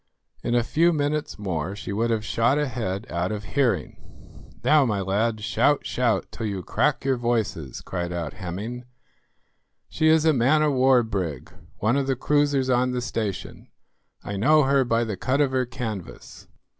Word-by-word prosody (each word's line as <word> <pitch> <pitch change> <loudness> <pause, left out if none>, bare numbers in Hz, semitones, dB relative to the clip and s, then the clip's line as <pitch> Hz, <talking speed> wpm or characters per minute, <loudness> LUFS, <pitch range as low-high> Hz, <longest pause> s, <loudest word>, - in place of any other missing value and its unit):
In 120 - 0
a 120 - +3
few 165 +8 +3
minutes 150 -1 -1
more 95 -2 -3
she 100 - -6
would 115 +3 0
have 110 -1 -1
shot 120 +6 +2
ahead 115 -8 -2
out 85 +3 -1
of 105 -1 -4
hearing. 130 +3 -1 0.6
"Now, 150 -1 +5
my 110 -6 0
lads, 105 +3 -1
shout, 145 +6 +2
shout, 115 -6 0
till 110 - -4
you 95 -3 -4
crack 150 - 0
your 135 -2 +2
voices," 110 - -2
cried 90 -1 -4
out 85 -4 -4
Hemming; 105 +8 -6 1.0
"she 155 - +1
is 160 0 +4
a 160 - +5
man 140 +5 +3
of 150 -2 +2
war 130 -1 +4
brig; 90 - -4 0.3
one 120 +6 +1
of 140 -1 0
the 135 - +1
cruisers 145 0 +1
on 125 0 +2
the 125 - -1
station. 110 -5 -4 0.6
I 100 - -4
know 150 +9 +4
her 135 0 +3
by 115 -1 +1
the 105 -4 -4
cut 130 +2 0
of 140 -3 +2
her 130 -2 0
canvas." 115 -8 -7
120 Hz, 175 wpm, -24 LUFS, 100-135 Hz, 1.0 s, Now